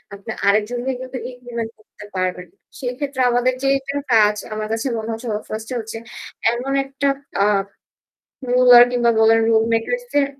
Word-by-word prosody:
আপনি 200 +3 -8 0.2
আরেকজনরে 235 +5 +1
কিন্তু 255 0 -6
implement 240 -2 -6
করতে 215 -1 -15
পারবেন 180 -1 -2
না। - - -36 0.2
সেক্ষেত্রে 260 +1 -3
আমাদের 245 +1 +2
যে 270 - +2
এটার 275 +1 -4
কাজ 210 -2 +5 0.2
আমার 215 0 -3
কাছে 225 +4 -2
মনে 220 +1 -5
হচ্ছে 225 +2 -7
ও - - 0
1st 220 +1 -5
এ - - -2
হচ্ছে 225 0 -6 0.5
এমন 255 +3 -3
একটা 275 +1 -2 0.4
আ - - +4 1.1
রুলার 245 -1 +8
কিংবা 240 -1 +2
বলেন 225 0 +5
রুল 220 -1 +4
মেকারসদের 290 - 0
240 Hz, 160 wpm, -20 LUFS, 220-255 Hz, 1.1 s, রুলার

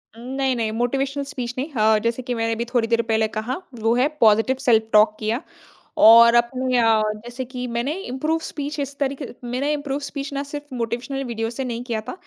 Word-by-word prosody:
उम 230 - -12
नहीं, 270 -1 +1
नहीं 225 -2 -1
motivational 270 +5 -1
speech 255 -4 -5
नहीं। 280 +5 -3
अ, 215 0 +4
जैसे 230 +2 -1
कि 250 0 -3
मैंने 225 0 -1
भी 235 +1 -3
थोड़ी 240 -1 0
देर 230 0 +2
पहले 220 0 +2
कहा, 220 +4 -3 0.2
वो 225 0 +1
है 255 +3 +3
पॉज़िटिव 225 +3 +4
सेल्फ़ 230 -4 +3
टॉक 215 0 +5
किया 225 +4 -1 0.6
और 230 +1 +8
अ, 240 - +8 0.8
जैसे 245 +2 -6
कि 250 0 -6
मैंने 245 +5 -1
इम्प्रूव 310 0 -2
स्पीच 295 +1 -5
इस 280 0 -4
तरीके 275 0 -2 0.2
मैंने 255 +5 -1
इम्प्रूव 285 -2 -2
स्पीच 280 0 -6
ना 280 0 -2
सिर्फ़ 290 -2 -7
मोटिवेशनल 245 +3 -3
वीडियोज़ 230 -1 -3
से 265 - -3
नहीं 240 -1 -4
किया 230 -3 -2
था। - - -3
245 Hz, 200 wpm, -22 LUFS, 230-275 Hz, 0.8 s, और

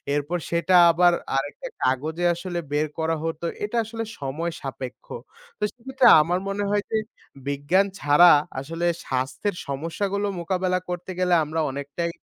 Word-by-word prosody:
এরপর 145 +4 -1
সেটা 170 +2 +2 0.2
আবার 175 +1 +4 0.2
আরেকটা 145 - -4 0.2
কাগজে 155 +7 0
আসলে 175 0 -4
বের 150 +1 +1
করা 160 0 +1
হতো। 165 0 -3 0.2
এটা 210 +3 -2
আসলে 225 +1 -5 0.2
সময় 150 +5 -3
সাপেক্ষ। 130 -2 -7 0.5
তো - - -3
সেক্ষেত্রে 260 +1 +1
আমার 175 +4 0
মনে 200 +1 -2
হয় 205 0 +1
যে 220 - +2 0.5
বিজ্ঞান 145 +8 +2
ছাড়া 150 +5 +7 0.3
আসলে 165 +5 -4 0.2
স্বাস্থ্যের 130 +10 -2
সমস্যাগুলো 190 +8 -2
মোকাবেলা 185 +1 0
করতে 180 +1 -4
গেলে 180 -1 +2
আমরা 155 +2 -3
অনেকটাই 145 +5 -4
170 Hz, 140 wpm, -24 LUFS, 145-185 Hz, 0.5 s, ছাড়া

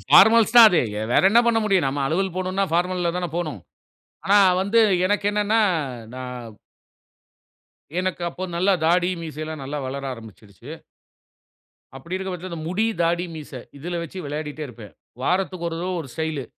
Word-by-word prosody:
Formals 225 0 +6
தான் 235 -2 +11
அது. 175 - +3 0.3
வேற - - +4
என்ன 230 +3 +6
பண்ண 230 -1 +3
முடியும். 190 -8 +2
நம்ம 140 +2 -2
அலுவல் 180 +4 -1
போணுன்னா, 185 +1 -1
ஃபார்மல்ல 175 0 0
தான 180 -1 -2
போணும். 155 - -3 0.6
ஆனா 200 +1 +4 0.2
வந்து 200 +4 +3 0.3
எனக்கு 205 +1 0
என்னன்னா, 210 +2 +1 0.5
நான் 125 -3 -8 1.4
எனக்கு 185 -1 -2
அப்போ 180 +2 -6
நல்லா 190 +3 +3
தாடி, 175 +1 +3
மீசைல்லாம் 155 -1 -6
நல்லா 145 +2 -4
வளர 140 +1 -5
ஆரம்பிச்சிருச்சு. 110 +2 -14 1.3
அப்படி 170 +7 -7
இருக்க 190 0 -4
பட்சத்துல, 180 0 -7
அந்த 160 -2 -6
முடி, 205 +6 0 0.2
தாடி, 170 +1 +1
மீச 150 -2 -9 0.3
இதுல 170 +4 -4
வச்சு 170 +3 -8
விளையாடிட்டே 150 +1 -5
இருப்பேன். 110 -4 -12 0.3
வாரத்துக்கு 185 +1 -1
1 165 - -5
தரவ 180 +1 -2
ஒரு 140 - -11
ஸ்டைலு. 160 -5 -3
170 Hz, 150 wpm, -23 LUFS, 145-190 Hz, 1.4 s, தான்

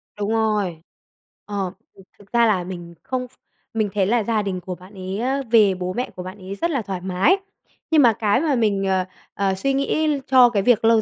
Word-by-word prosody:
Đúng 205 0 -3
rồi. 210 -7 0 0.6
Ờ, 195 -3 -3 0.3
thực 195 - -15 0.2
thực 200 - -19
ra 235 0 +5
là 195 -5 +2
mình 175 -1 -8
không 255 -1 -3
ph 250 - -31 0.4
mình 215 -2 0
thấy 195 -2 +2
là 225 +1 +2
gia 220 0 0
đình 195 -3 -3
của 180 +1 -5
bạn 185 +3 -16
ấy 190 +1 -5
á, 265 +3 0
về 210 -5 +6
bố 180 0 -3
mẹ 250 - -2
của 180 - -6
bạn 185 +2 -8
ấy 190 +1 -7
rất 340 +9 -1
là 270 -5 0
thoải 190 -3 -5
mái. 190 - +2 0.5
Nhưng 315 -2 +6
mà 235 -4 +6
cái 210 +3 +1
mà 300 -4 +1
mình, 205 -4 +1
ờ, 190 -1 +1 0.3
ờ, 195 -1 0
suy 275 +8 0
nghĩ 290 +1 +1
cho 255 -2 +7
cái 205 -4 0
việc 225 -1 +3
lâu 225 -1 +5
205 Hz, 230 wpm, -22 LUFS, 190-240 Hz, 0.6 s, cho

